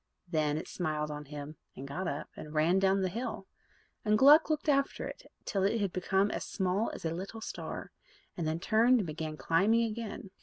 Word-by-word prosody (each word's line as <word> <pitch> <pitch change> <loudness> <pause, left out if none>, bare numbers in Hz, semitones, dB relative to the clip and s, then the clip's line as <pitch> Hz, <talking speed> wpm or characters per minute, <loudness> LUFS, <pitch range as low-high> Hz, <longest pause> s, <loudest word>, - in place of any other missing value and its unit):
Then 155 -3 +1
it 160 - -5
smiled 155 -3 -2
on 150 0 -6
him, 145 +1 -8 0.2
and 135 - -7
got 175 +6 -3
up, 145 -2 -3
and 150 0 -9
ran 165 +5 +4
down 195 0 +3
the - - +2
hill; 230 +8 -4 0.6
and 215 0 +3
Gluck 295 +7 +7
looked 310 0 -1
after 275 -1 +1
it - - -10
till 195 - -1
it 200 -1 +1
became 190 +2 +1
as - - -3
small 190 +3 0
as - - -8
a 160 - 0
little 195 +6 -6
star, 220 - -6 0.4
and 165 -3 -2
then 160 +1 -1
turned 230 +5 +4
and - - -3
began 155 -1 -5
climbing 205 +10 +3
again. 220 -3 -5
190 Hz, 195 wpm, -31 LUFS, 155-220 Hz, 0.6 s, Gluck